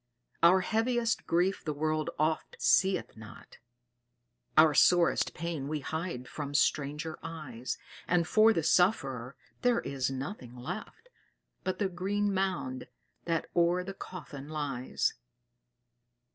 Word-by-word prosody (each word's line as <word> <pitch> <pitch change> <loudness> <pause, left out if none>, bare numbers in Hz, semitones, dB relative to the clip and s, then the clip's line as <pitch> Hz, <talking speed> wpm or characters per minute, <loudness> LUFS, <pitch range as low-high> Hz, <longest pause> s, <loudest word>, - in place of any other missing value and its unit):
Our 180 +3 +6
heaviest 230 +3 0
grief 180 +3 +1
the 150 -2 -3
world 155 +1 0
oft 155 +1 0
seeth 190 0 +2
not, 110 0 -13 1.0
Our 155 -1 +7
sorest 175 +3 +4
pain 160 -4 -3
we 150 0 -2
hide 160 -4 -4
from 145 -1 -5
stranger 150 +2 0
eyes: 150 -7 -5 0.3
And 170 -2 +2
for 220 +3 +6
the 165 -7 0
sufferer 135 - +2 0.3
there 245 -1 +3
is 135 -2 -2
nothing 135 - -6
left 185 - -7 0.5
But 185 0 -2
the 200 - +1
green 200 +3 -1
mound 185 -10 -2 0.4
that 165 -2 0
o'er 175 +1 +3
the 195 +1 -6
coffin 150 -7 -9
lies." 140 -5 -1
165 Hz, 120 wpm, -30 LUFS, 140-185 Hz, 1.0 s, Our